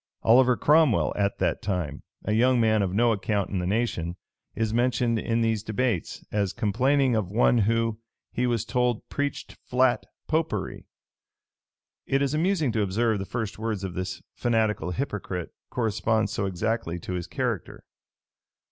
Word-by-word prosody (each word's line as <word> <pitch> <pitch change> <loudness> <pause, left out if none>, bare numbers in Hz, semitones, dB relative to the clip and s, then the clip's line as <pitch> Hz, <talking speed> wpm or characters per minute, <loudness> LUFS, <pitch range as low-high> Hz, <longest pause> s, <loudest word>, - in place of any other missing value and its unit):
[] - - -42
Oliver 125 +2 +5
Cromwell, 150 -5 +4
at 100 0 0
that - - 0
time 90 -8 -2 0.2
a 105 - -1
young 125 +3 +4
man 110 -2 +3
of 95 -2 0
no 115 +4 +3
account 100 -1 -1
in 95 - -1
the 90 - -2
nation, 95 -5 -1 0.4
is 110 -1 -1
mentioned 120 -1 +1
in 115 +2 0
these 110 -2 +1
debates, 110 -3 -2
as 100 -3 0
complaining 125 +4 +2
of 105 -5 -1
one 120 +3 +3
who, 115 +1 +1 0.3
he 125 +1 0
was 120 -4 0
told, 125 -2 0
preached 145 0 -3
flat 125 0 +2 0.2
Popery.[] 155 - -2 1.2
It 135 +1 +2
is 140 0 0
amusing 160 -3 +1
to 110 - 0
observe 105 +2 +1
the 95 - -3
first 110 -1 -4
words 110 -3 -2
of 95 -2 -4
this 95 +1 -4
fanatical 110 -5 0
hypocrite 100 -6 -4 0.2
correspond 110 -2 0
so 100 -4 -1
exactly 95 -1 -2
to 90 +2 -6
his 90 -1 -3
character. - - -3
110 Hz, 155 wpm, -26 LUFS, 100-125 Hz, 1.2 s, Oliver